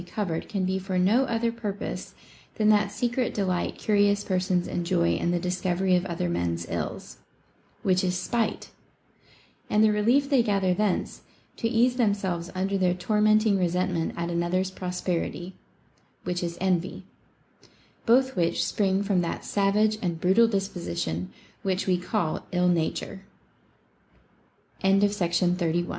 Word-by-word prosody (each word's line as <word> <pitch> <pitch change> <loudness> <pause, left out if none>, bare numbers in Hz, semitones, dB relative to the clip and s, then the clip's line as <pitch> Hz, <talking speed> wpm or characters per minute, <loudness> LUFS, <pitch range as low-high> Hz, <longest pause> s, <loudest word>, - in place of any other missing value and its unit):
433 175 -2 -3
covered - - -17
can 195 -3 0
be 190 +1 0
for 190 0 -3
no 210 +9 +3
other 230 -1 0
purpose 210 -4 -5 0.4
than 215 -1 +2
that 205 -1 +3
secret 245 +3 -1
de 200 - 0
light 180 -1 -1
curious 205 -1 +2
persons 185 -1 0
enjoy 170 -1 0
in - - -1
the 175 - +1
discovery 180 +1 0
of 180 +1 0
other 170 - -2
men's 85 -1 -2
ills, - - -5 0.3
— - - -36
which 185 -1 +2
is 180 -1 0
spite, 225 +4 -2 0.5
— - - -31
and 210 +1 +3
the 215 - +5
relief 235 +7 +2
they 275 -3 +4
gather 195 -4 +1
thence, 205 0 -1 0.3
to 230 - -1
ease 240 +2 +2
themselves 195 -7 0
under 195 +1 -1
their 180 -1 +2
tormenting 215 +1 +3
resentment 180 -1 0
at 170 0 -2
another's 175 +2 0
prosperity, 180 -1 -3 0.4
— - - -38
which 175 -1 -2
is 170 -1 -4
envy; 185 -2 -1 0.5
— - - -30
both 260 +3 +4
which 170 -2 +1
spring 195 -1 +1
from 195 -3 +1
that 170 - -4
savage 210 +2 +2
and 170 -3 -2
brutal 190 +7 +4
disposition 90 - -3 0.3
which 190 -2 -1
we 180 -2 +1
c 195 +4 -3
190 Hz, 140 wpm, -26 LUFS, 180-210 Hz, 0.5 s, the